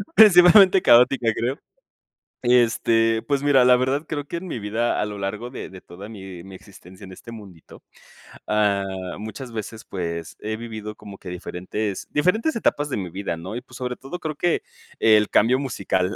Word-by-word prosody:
Principalmente 190 -1 +7
caótica, 120 0 +4
creo. 125 +4 -2 0.9
Este, 115 -2 +3
pues 140 -1 -2
mira, 135 -3 +5
la 125 0 +7
verdad 130 +4 0
creo 145 -2 -4
que 170 - -5
en 185 +2 -7
mi 160 - -4
vida 110 +3 -1
a 105 - 0
lo 105 -1 -7
largo 105 +5 -4
de - - -7
de 95 -1 -11
toda 100 +5 -12
mi 95 -5 -10
mi 95 -1 -11
existencia 95 0 -15
en 95 - -10
este 115 - -12
mundito, 100 -7 -13 0.6
ah, 105 -2 +1 0.3
muchas 110 +4 -8
veces, 110 0 -7
pues, 85 -3 -5
he 110 +1 -4
vivido 110 -2 -7
como 100 -2 -12
que 95 - -11
diferentes 95 +3 -5
diferentes 205 - +1
etapas 150 -9 0
de - - -3
mi 95 -4 -4
vida, 95 -2 -4
¿no? 95 +7 -7
Y, 125 - -5
pues, 125 -1 -14
sobre 125 -1 -4
todo, 135 +7 -8
creo 155 -2 -4
que 175 +3 0 0.4
el 105 -1 +4
cambio 125 +5 +3
musical, 100 -7 -2
115 Hz, 180 wpm, -23 LUFS, 100-135 Hz, 0.9 s, Principalmente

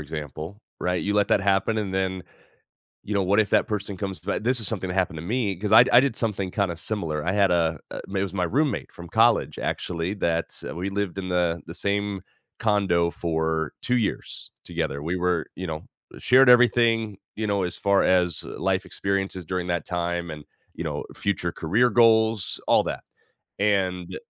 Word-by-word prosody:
example, 75 - -7 0.2
right, 90 0 0
you 100 - -1
let 105 -1 +2
that - - +3
happen 100 +3 +1
and 100 -3 -3
then, 95 -1 -1 0.8
you 105 - -4
know, 100 - +2
what 100 +3 +3
if 110 - +1
that - - +3
person 100 -2 -3
comes 95 -3 -4
ba 95 +6 -2
this 125 +2 +1
is 110 - 0
something 95 -4 -2
that 90 - -2
happened 90 -4 0
to - - -5
me, 105 -2 -1
‘cause 105 +3 -3
I 110 +2 +9
d - - -3
I 120 - +8
did 135 -3 +1
something 100 -6 -2
kinda 95 -4 -1
similar, 80 -9 -2
I 95 - +1
had 100 -2 +3
a 80 -3 +1
a - - -6 0.2
it 95 - +1
was 95 - -5
my 90 -2 0
roommate 140 - 0
from 85 - -11
college, - - +3
actually, 85 +2 -2
that, 85 -4 -1
uh, - - -6
we 90 +3 -3
lived 100 -2 -3
in 95 -1 -5
the 85 -1 0
the 85 - -7
same 100 0 -1 0.4
condo 95 -6 +2
for 80 -2 -1
2 125 0 +1
years 110 - -3
together, 70 +1 -3
we 85 +3 -2
were 90 -2 0
you 95 -1 -5
know, 80 -1 -5 0.4
shared 130 0 +6
everything, 115 -4 +4 0.2
you 110 -1 -2
know, 100 -2 +1
as 90 0 -3
far 100 -1 +3
as, 90 -2 +2
uh, - - -8
life - - 0
experiences 95 -2 -2
during 90 +1 -3
that 85 -3 -1
time 85 -1 -2
and, 75 -1 -9 0.3
you - - -6
know, - - -3
future 90 -3 -1
career 105 +11 +2
goals, 110 -2 +3
all - - +5
that, - - -4 0.6
and 95 -4 0
95 Hz, 200 wpm, -25 LUFS, 85-105 Hz, 0.8 s, I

